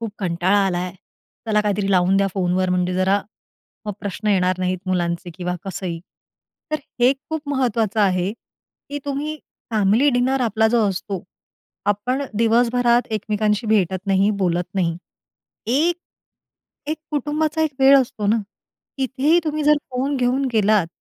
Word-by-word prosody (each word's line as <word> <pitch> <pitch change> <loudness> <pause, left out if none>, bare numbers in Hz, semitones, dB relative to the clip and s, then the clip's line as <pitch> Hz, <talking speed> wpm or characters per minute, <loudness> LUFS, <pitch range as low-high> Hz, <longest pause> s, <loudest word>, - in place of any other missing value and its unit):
खूप 225 -2 -4
कंटाळा 185 +1 +1
आलाय. 180 -1 -2 0.5
चला 210 -1 +2
काहीतरी 205 -1 0
लावून 185 0 +3
द्या 195 0 +3
फोनवर, 185 -1 +1
म्हणजे 180 0 0
जरा 190 +2 +2 0.7
मग 210 - -2
प्रश्न 205 +2 -3
येणार 185 -2 +2
नाहीत 185 0 -1
मुलांचे 175 -1 -1
किंवा 180 0 -3
कसंही. 185 -3 -4 0.7
तर 310 - +1 0.2
हे 245 +2 +6
खूप 300 +2 -7
महत्त्वाचं 230 -6 0
आहे, 185 -1 +2
की 285 +4 -12
तुम्ही 290 +2 -3 0.3
फॅमिली 215 +5 +3
डिनर 260 +2 +1
आपला 220 -2 +2
जो 235 - +4
असतो, 195 0 -4 0.7
आपण 250 +7 -2 0.2
दिवसभरात 240 +1 +3
एकमेकांशी 210 +1 -1
भेटत 190 -3 +1
नाही, 195 +1 +3
बोलत 175 +1 -1
नाही. 170 -4 0 0.7
एक 310 +9 +2 0.9
एक 310 - -1
कुटुंबाचा 300 +2 0
एक 315 - +1
वेळ 270 +1 +8
असतो 230 -5 -2
ना, 215 +3 +3 0.6
तिथेही 270 +5 +2
तुम्ही 305 -1 -1
जर 300 +1 +6 0.2
फोन 265 +3 -1
घेऊन 255 +2 +1
गेलात 210 -4 +3
210 Hz, 140 wpm, -21 LUFS, 185-260 Hz, 0.9 s, वेळ